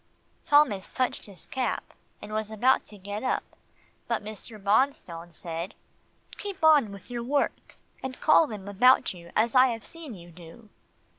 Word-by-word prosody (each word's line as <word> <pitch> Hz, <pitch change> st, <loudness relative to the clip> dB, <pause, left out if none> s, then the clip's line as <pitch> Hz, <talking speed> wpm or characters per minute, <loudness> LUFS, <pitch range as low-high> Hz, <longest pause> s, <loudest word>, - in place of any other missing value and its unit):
Thomas 285 Hz, -10 st, +3 dB
touched 255 Hz, -3 st, -2 dB
his 195 Hz, -3 st, -10 dB
cap, 260 Hz, -1 st, -3 dB, 0.3 s
and 215 Hz, -, -8 dB
was 215 Hz, 0 st, -2 dB
about 245 Hz, +5 st, +2 dB
to 210 Hz, -, -11 dB
get 205 Hz, +2 st, -5 dB
up 260 Hz, -, 0 dB, 0.6 s
but 230 Hz, -3 st, -1 dB
Mr. 215 Hz, +1 st, -9 dB
Bonstone 195 Hz, -5 st, 0 dB
said, 170 Hz, +3 st, -6 dB, 0.6 s
"Keep 400 Hz, -5 st, -6 dB
on 295 Hz, -9 st, +6 dB
with 200 Hz, +4 st, -11 dB
your 240 Hz, -1 st, -3 dB
work, 280 Hz, +4 st, -1 dB, 0.3 s
and 265 Hz, -1 st, -6 dB
call 310 Hz, 0 st, +5 dB
them 205 Hz, -5 st, -8 dB
about 245 Hz, +5 st, +4 dB
you 170 Hz, -1 st, -13 dB
as 225 Hz, +2 st, +2 dB
I 255 Hz, 0 st, +7 dB
have 230 Hz, -3 st, -4 dB
seen 320 Hz, -8 st, -8 dB
you 175 Hz, -1 st, -13 dB
do." 175 Hz, +6 st, -14 dB
220 Hz, 160 wpm, -27 LUFS, 195-260 Hz, 0.6 s, I